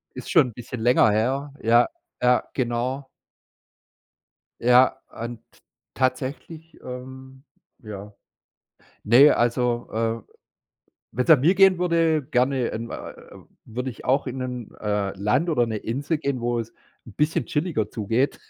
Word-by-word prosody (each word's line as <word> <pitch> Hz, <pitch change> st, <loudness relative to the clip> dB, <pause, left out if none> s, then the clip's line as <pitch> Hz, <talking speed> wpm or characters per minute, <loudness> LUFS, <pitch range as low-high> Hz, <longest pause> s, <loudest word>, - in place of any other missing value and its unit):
Ist -, -, -8 dB
schon 160 Hz, -8 st, +5 dB
'n -, -, -13 dB
bisschen 120 Hz, +1 st, -7 dB
länger 120 Hz, -1 st, +4 dB
her. 135 Hz, +7 st, -1 dB
Ja, 120 Hz, +2 st, +4 dB, 0.3 s
ja, 125 Hz, 0 st, +3 dB
genau. 130 Hz, +2 st, -2 dB, 1.5 s
Ja, 125 Hz, +2 st, +5 dB, 0.2 s
und 115 Hz, 0 st, -5 dB, 0.5 s
tatsächlich, 140 Hz, +5 st, -3 dB
ähm 130 Hz, +1 st, -9 dB, 0.4 s
ja. 105 Hz, -1 st, -9 dB, 0.9 s
Ne, 130 Hz, +7 st, +7 dB
also, 120 Hz, 0 st, 0 dB
äh, 115 Hz, 0 st, -3 dB, 0.8 s
wenn's 125 Hz, +3 st, -2 dB
nach 160 Hz, -4 st, +8 dB
mir 160 Hz, +9 st, +3 dB
gehen 190 Hz, -1 st, +5 dB
würde, 165 Hz, -3 st, +2 dB
gerne 130 Hz, 0 st, +1 dB
in, 115 Hz, +1 st, -5 dB
äh, -, -, -7 dB, 0.5 s
würde 125 Hz, +3 st, -4 dB
ich 115 Hz, -, -13 dB
auch 135 Hz, +3 st, +1 dB
in 130 Hz, 0 st, -5 dB
'n, 125 Hz, -3 st, -6 dB
äh, 105 Hz, -2 st, -1 dB
Land 105 Hz, -, +1 dB
oder 120 Hz, -7 st, +2 dB
'ne 110 Hz, -1 st, -3 dB
Insel 140 Hz, +9 st, -2 dB
gehen, 140 Hz, -4 st, -2 dB
wo 120 Hz, 0 st, -1 dB
es 115 Hz, 0 st, -8 dB, 0.3 s
'n 115 Hz, -, -11 dB
bisschen 150 Hz, +6 st, 0 dB
chilliger 150 Hz, -, -1 dB
zugeht, 115 Hz, +6 st, -1 dB
125 Hz, 135 wpm, -24 LUFS, 115-140 Hz, 1.5 s, nach